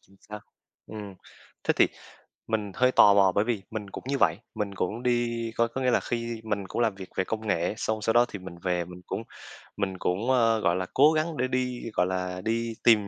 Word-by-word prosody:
chính 95 Hz, -, -24 dB
xác. 105 Hz, 0 st, -7 dB, 0.5 s
Ừm. 105 Hz, -3 st, -8 dB, 0.5 s
Thế -, -, +2 dB
thì -, -, +5 dB, 0.6 s
mình 105 Hz, -3 st, -2 dB
hơi 125 Hz, 0 st, +3 dB
tò 100 Hz, -1 st, +7 dB
mò 95 Hz, -2 st, +5 dB
bởi 100 Hz, -, +3 dB
vì 110 Hz, -5 st, -1 dB
mình 105 Hz, -3 st, -5 dB
cũng -, -, -8 dB
như 140 Hz, 0 st, 0 dB
vậy, 85 Hz, -3 st, +3 dB, 0.2 s
mình 105 Hz, -2 st, -3 dB
cũng 105 Hz, +6 st, -2 dB
đi 120 Hz, -2 st, 0 dB
có 115 Hz, 0 st, +3 dB
có 130 Hz, +3 st, -5 dB
nghĩa 125 Hz, -1 st, +2 dB
là -, -, +3 dB
khi 115 Hz, -1 st, -3 dB
mình 100 Hz, -3 st, -2 dB
cũng -, -, -3 dB
làm 110 Hz, -4 st, +2 dB
việc 95 Hz, -1 st, -9 dB
về 95 Hz, -, +1 dB
công 110 Hz, +1 st, -4 dB
nghệ, 90 Hz, 0 st, 0 dB
xong 110 Hz, -1 st, -2 dB
sau 115 Hz, -, +2 dB
đó 120 Hz, +1 st, +6 dB
thì 100 Hz, -, -7 dB
mình 90 Hz, -1 st, -9 dB
về 90 Hz, -2 st, 0 dB
mình 90 Hz, +1 st, -11 dB
cũng 110 Hz, -, -3 dB, 0.6 s
mình 95 Hz, -2 st, -2 dB
cũng, 100 Hz, +9 st, -1 dB
ơ, 115 Hz, -3 st, +4 dB
gọi 85 Hz, -3 st, +2 dB
là, 95 Hz, 0 st, -1 dB
cố 150 Hz, +3 st, +6 dB
gắng 155 Hz, 0 st, -1 dB
để 130 Hz, +1 st, +1 dB
đi, 125 Hz, -1 st, -1 dB
gọi 90 Hz, -, +2 dB
là, 90 Hz, 0 st, -3 dB
đi 115 Hz, 0 st, -1 dB
tìm 105 Hz, -4 st, +5 dB
110 Hz, 235 wpm, -27 LUFS, 95-120 Hz, 0.6 s, tò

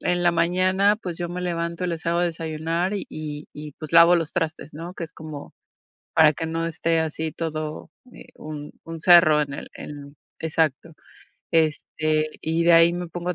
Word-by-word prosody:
en 175 Hz, 0 st, 0 dB
la 175 Hz, 0 st, +4 dB
mañana, 185 Hz, +4 st, +2 dB
pues 180 Hz, -6 st, -6 dB
yo 175 Hz, -1 st, -3 dB
me 180 Hz, +1 st, -5 dB
levanto, 170 Hz, 0 st, -2 dB
les 165 Hz, -1 st, -4 dB
hago 170 Hz, +1 st, +2 dB
de 175 Hz, -, +2 dB
desayunar 165 Hz, +3 st, -2 dB
y 200 Hz, -, -4 dB
y 150 Hz, -1 st, -6 dB
y 150 Hz, -1 st, -9 dB
pues 155 Hz, +1 st, -10 dB
lavo 170 Hz, +1 st, +8 dB
los 165 Hz, -2 st, -2 dB
trastes, 160 Hz, -3 st, -3 dB
¿no?, 170 Hz, +4 st, -7 dB
que 170 Hz, -, -5 dB
es 155 Hz, -, -11 dB
como 155 Hz, -2 st, -9 dB, 0.6 s
para 155 Hz, -2 st, +7 dB
que 160 Hz, +3 st, -4 dB
no 165 Hz, +1 st, -2 dB
esté 165 Hz, 0 st, 0 dB
así 160 Hz, 0 st, -3 dB
todo, 155 Hz, -2 st, -5 dB, 0.2 s
eh, -, -, -13 dB
un 150 Hz, -1 st, -8 dB
un 165 Hz, 0 st, -7 dB
cerro 170 Hz, -4 st, +7 dB
en 140 Hz, -1 st, -3 dB
el -, -, -7 dB
en 145 Hz, -1 st, -9 dB, 0.2 s
exacto. 160 Hz, 0 st, -1 dB, 0.6 s
Este, 155 Hz, -1 st, +1 dB
y 165 Hz, +1 st, 0 dB
de 170 Hz, -, +6 dB
ahí 165 Hz, +1 st, +7 dB
me 175 Hz, 0 st, -4 dB
pongo 175 Hz, +2 st, -4 dB
a -, -, -2 dB
165 Hz, 195 wpm, -24 LUFS, 155-175 Hz, 0.6 s, lavo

